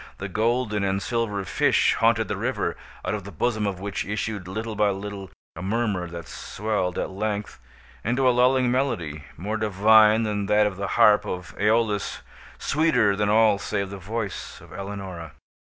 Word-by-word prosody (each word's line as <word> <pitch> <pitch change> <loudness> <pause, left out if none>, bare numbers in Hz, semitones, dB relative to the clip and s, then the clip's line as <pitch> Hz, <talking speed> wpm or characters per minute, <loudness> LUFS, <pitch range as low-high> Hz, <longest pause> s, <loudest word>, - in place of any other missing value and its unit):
The 100 - -5
golden 110 +1 0
and 95 0 +1
silver 105 -2 -2
fish - - +3
haunted - - +2
the - - -2
river, - - -2 0.3
out - - -1
of 105 -2 -3
the 100 - -9
bosom 110 -3 0
of 95 -2 -3
which 100 0 -3
issued, 105 -2 -3
little 110 +4 -4
by 105 0 +3
little, 100 -1 -5 0.3
a 80 - -7
murmur 100 -2 -1
that 85 -2 -8
swelled, 105 -4 -3
at - - -2
length, 105 +1 -3 0.4
into 125 +4 +1
a - - +6
lulling 125 0 +3
melody 95 - -1
more 105 +6 -3
divine 110 +1 +5
than 105 -2 -1
that 105 +1 +4
of 100 -2 -2
the 100 0 -2
harp 105 0 +6
of 90 -1 -5
Æolus—sweeter 110 +3 0
than 105 +1 0
all 110 -1 +4
save 100 -2 -2
the 100 - -6
voice 100 +2 -5
of - - -14
Eleonora. 95 -5 -7
105 Hz, 170 wpm, -25 LUFS, 95-110 Hz, 0.4 s, a